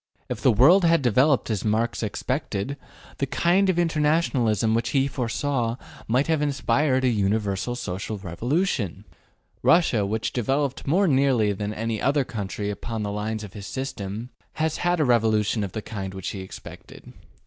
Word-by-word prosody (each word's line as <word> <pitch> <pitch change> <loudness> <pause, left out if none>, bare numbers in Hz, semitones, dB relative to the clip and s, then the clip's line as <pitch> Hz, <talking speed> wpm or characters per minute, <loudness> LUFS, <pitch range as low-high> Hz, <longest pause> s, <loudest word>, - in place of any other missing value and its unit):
If - - -4
the 130 - +5
world 150 - +6
had 165 -3 +4
developed 130 +2 +3
as 105 -4 -1
Marx 110 +2 0
expected, 125 +2 -3 0.4
the 140 - 0
kind 185 +7 +2
of 185 - +1
internationalism 150 - +2
which 115 +1 0
he 135 0 +3
foresaw 125 -1 -1 0.3
might 125 +5 +2
have 160 -2 +1
inspired 140 -1 +1
a - - +3
universal 105 +1 0
social 105 -1 -4
revolution. 105 - -2 0.6
Russia, 160 - +4
which 110 +3 -2
devel 135 +4 +1
oped 135 0 -7
more 185 +7 +3
nearly 130 -7 +3
than 105 +1 -4
any 110 0 -3
other 140 0 +2
country 105 -4 -4
upon 110 +1 -4
the 100 - -3
lines 110 +1 -3
of 105 - -9
his 100 -2 -8
system, 115 -3 -5 0.2
has 155 0 -1
had 175 0 +1
a 150 - +3
revolution 110 -3 +2
of 95 - -5
the 110 - -4
kind 95 -3 -6
which 95 0 -4
he 100 - -6
expected. 95 - -11
120 Hz, 165 wpm, -24 LUFS, 105-140 Hz, 0.6 s, world